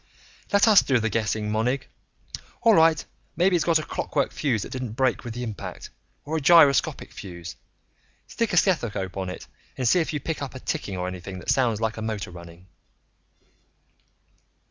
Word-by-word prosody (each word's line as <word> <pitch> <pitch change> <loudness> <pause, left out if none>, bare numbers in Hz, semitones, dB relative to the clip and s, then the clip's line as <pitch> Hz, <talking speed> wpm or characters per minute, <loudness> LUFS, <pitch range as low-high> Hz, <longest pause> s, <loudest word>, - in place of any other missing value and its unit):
"Let 200 +2 +4
us 210 -3 +8
do 130 - +2
the 110 -1 -1
guessing, 105 0 -1
Monig. 125 +5 -1 0.8
All 230 -2 +6
right, 165 -3 +4 0.3
maybe 180 +1 +3
it's 170 - +2
got 170 -2 +4
a 155 - -3
clockwork 140 -2 -2
fuse 125 -9 -1
that - - -9
didn't 125 -4 -5
break 130 +1 0
with 120 -2 -6
the 125 - -4
impact. 110 -4 -7 0.3
Or 160 +2 -2
a - - -2
gyroscopic 155 -1 +4
fuse. 85 -4 -9 0.7
Stick 230 -2 -2
a 175 - 0
stethoscope 110 - +1
on 95 -1 -3
it 90 - -8 0.3
and 130 - 0
see 180 - +4
if 160 0 -1
you 150 - -2
pick 160 +2 -4
up 135 -2 -5
a - - -6
ticking 100 -6 -4
or 90 0 -2
anything 95 +1 -7
that 90 - -2
sounds 120 -5 +1
like 110 0 -1
a - - -5
motor 110 -4 -4
running." 85 0 -12
125 Hz, 185 wpm, -25 LUFS, 105-160 Hz, 0.8 s, us